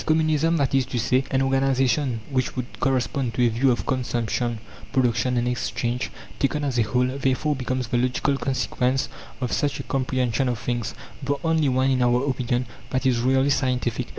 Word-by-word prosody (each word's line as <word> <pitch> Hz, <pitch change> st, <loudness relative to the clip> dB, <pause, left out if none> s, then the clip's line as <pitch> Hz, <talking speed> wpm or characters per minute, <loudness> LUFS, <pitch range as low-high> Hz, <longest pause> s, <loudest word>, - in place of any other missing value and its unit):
Communism 160 Hz, +1 st, +2 dB
that 140 Hz, -3 st, +1 dB
is 135 Hz, -2 st, +2 dB
to 130 Hz, -, -3 dB
say, 125 Hz, +3 st, +2 dB
an 130 Hz, 0 st, +2 dB
organization 135 Hz, -2 st, +1 dB
which 130 Hz, -1 st, 0 dB
would 125 Hz, -1 st, -6 dB
correspond 130 Hz, -1 st, 0 dB
to 125 Hz, -, +3 dB
a -, -, +4 dB
view 120 Hz, +4 st, +2 dB
of 120 Hz, -, 0 dB
Consumption, 120 Hz, -2 st, -1 dB, 0.3 s
Production, 125 Hz, -1 st, +1 dB
and 120 Hz, 0 st, +1 dB
Exchange, 125 Hz, 0 st, -2 dB, 0.3 s
taken 145 Hz, +2 st, 0 dB
as 130 Hz, -4 st, 0 dB
a -, -, +5 dB
whole 125 Hz, +3 st, +1 dB
therefore 135 Hz, +3 st, 0 dB
becomes 130 Hz, -1 st, -2 dB
the 120 Hz, -, +1 dB
logical 130 Hz, +3 st, +1 dB
consequence 130 Hz, -1 st, 0 dB, 0.3 s
of 125 Hz, -, -1 dB
such 145 Hz, -1 st, 0 dB
a -, -, -4 dB
comprehension 130 Hz, -1 st, 0 dB
of 120 Hz, -, -1 dB
things 120 Hz, -1 st, -3 dB, 0.3 s
the 140 Hz, +1 st, 0 dB
only 160 Hz, -3 st, +2 dB
one, 130 Hz, +1 st, +2 dB
in 130 Hz, -1 st, +2 dB
our 125 Hz, +2 st, +2 dB
opinion, 125 Hz, -2 st, 0 dB, 0.2 s
that 130 Hz, +1 st, -1 dB
is 125 Hz, -3 st, +3 dB
really 130 Hz, +3 st, +3 dB
scientific. 125 Hz, -3 st, 0 dB
130 Hz, 180 wpm, -24 LUFS, 125-135 Hz, 0.3 s, a